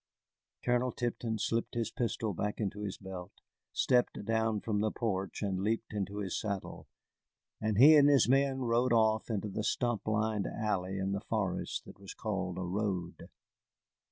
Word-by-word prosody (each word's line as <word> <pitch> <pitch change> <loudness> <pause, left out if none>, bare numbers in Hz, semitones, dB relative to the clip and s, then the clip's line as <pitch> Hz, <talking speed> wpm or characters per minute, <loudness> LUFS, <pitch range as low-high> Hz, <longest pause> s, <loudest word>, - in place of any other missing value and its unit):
Colonel 125 +1 +2
Tipton 120 -2 -2
slipped 115 +3 -1
his 115 -1 -1
pistol 115 -4 -1
back 105 +4 -2
into 105 -1 -2
his 100 -2 -4
belt, 95 -2 -8 0.4
stepped 125 -4 +1
down 110 -1 +1
from 105 0 -1
the 110 - +2
porch, 100 -4 -2
and 95 -2 -1
leaped 110 +2 -1
into 100 0 -3
his 95 -3 -2
saddle, 100 -3 -4 0.7
and 110 -2 0
he 145 +7 +9
and 145 -1 +7
his 140 -5 +5
men 135 +1 +3
rode 120 +1 +2
off 110 -1 +3
into 105 -2 -1
the 105 +2 -3
stump 120 -1 0
lined 110 -1 0
alley 95 -3 -2
in 95 0 -1
the 100 0 -2
forest 105 -5 -2
that - - -13
was 100 -1 -9
called 95 -4 -3
a 95 - -2
road. 90 -2 -3
110 Hz, 165 wpm, -32 LUFS, 100-115 Hz, 0.7 s, he